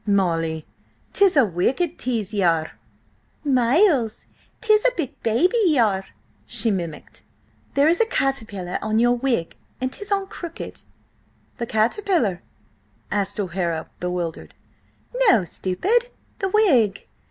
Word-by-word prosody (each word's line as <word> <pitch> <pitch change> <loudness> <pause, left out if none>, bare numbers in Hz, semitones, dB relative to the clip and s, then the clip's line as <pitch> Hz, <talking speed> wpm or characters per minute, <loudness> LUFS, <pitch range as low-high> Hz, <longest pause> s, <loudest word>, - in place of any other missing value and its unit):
"Molly, 165 -6 0 0.5
'tis 390 -5 +4
a 270 - +6
wicked 265 - -1
tease 225 -5 -2
ye 205 - 0
are!" 165 -3 +2 0.7
"Miles, 260 - +2 0.3
'tis 430 -1 +3
a - - +5
big 305 -7 -4
baby 330 - +2
you 305 -6 +3
are!" 195 -3 0 0.4
she 225 - +2
mimicked. 170 -5 -5 0.5
"There 280 +2 +4
is 340 +6 +3
a 455 - +3
caterpillar 220 - -2
on 215 0 0
your 240 +1 +4
wig, 240 -9 -1 0.2
and 255 0 -2
'tis 410 0 -6
on 395 -1 +1
crooked." 345 -3 -8 0.8
"The 235 - -3
caterpillar?" 230 - +1 0.7
asked 205 0 0
O'Hara, 175 -4 -2
bewildered. 180 -2 -4 0.7
"No, 215 - +5
stupid, 390 - 0 0.3
the 385 - -1
wig. 270 - +3
230 Hz, 125 wpm, -22 LUFS, -, 0.8 s, a